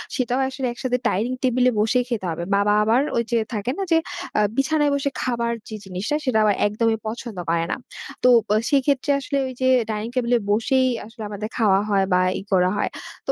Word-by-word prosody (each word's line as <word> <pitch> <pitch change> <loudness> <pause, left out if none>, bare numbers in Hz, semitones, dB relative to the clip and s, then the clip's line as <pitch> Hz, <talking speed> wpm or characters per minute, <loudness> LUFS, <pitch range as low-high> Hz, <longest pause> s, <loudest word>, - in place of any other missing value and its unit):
সেটাও 250 0 0
আসলে 265 -1 -3
একসাথে 250 +1 -1
ডাইনিং 230 +4 0
টেবলে 255 0 +3
বসেই 225 +4 +2
খেতে 225 -6 -2
হবে। 165 +1 -4
বাবা 200 +1 +3
আবার 225 +4 +3 0.2
ওই 235 - +2
যে 235 - +3 0.2
থাকে 215 +3 -2
না - - -3
যে, 330 - +6 0.4
আ - - +4 0.2
বিছানায় 295 +1 +2
বসে 280 0 0
খাবার 235 -2 -1 0.2
যে 220 - -6
জিনিসটা 190 +9 -3
সেটা 255 -4 +2
আবার 210 -2 +3
একদমই 220 +2 0
পছন্দ 230 -1 -6
করে 165 0 +1
না। - - 0 0.5
তো - - +6 0.2
ব - - -59 0.2
সেক্ষেত্রে 280 0 +2
আসলে 280 +1 -3
ওই 260 - -6
যে 260 - +3 0.2
ডাইনিং 215 +1 -3
টেবলে 245 -1 +2
বসেই 255 +5 +2 0.2
আসলে 225 +1 -10
আমাদের 210 +1 -5
খাওয়া 205 -5 +4
হয় 200 -2 +3
বা 180 - +4 0.2
ই - - -7
করা 180 -1 +4
হয়। - - 0 0.4
তো - - +2
235 Hz, 205 wpm, -22 LUFS, 210-255 Hz, 0.5 s, যে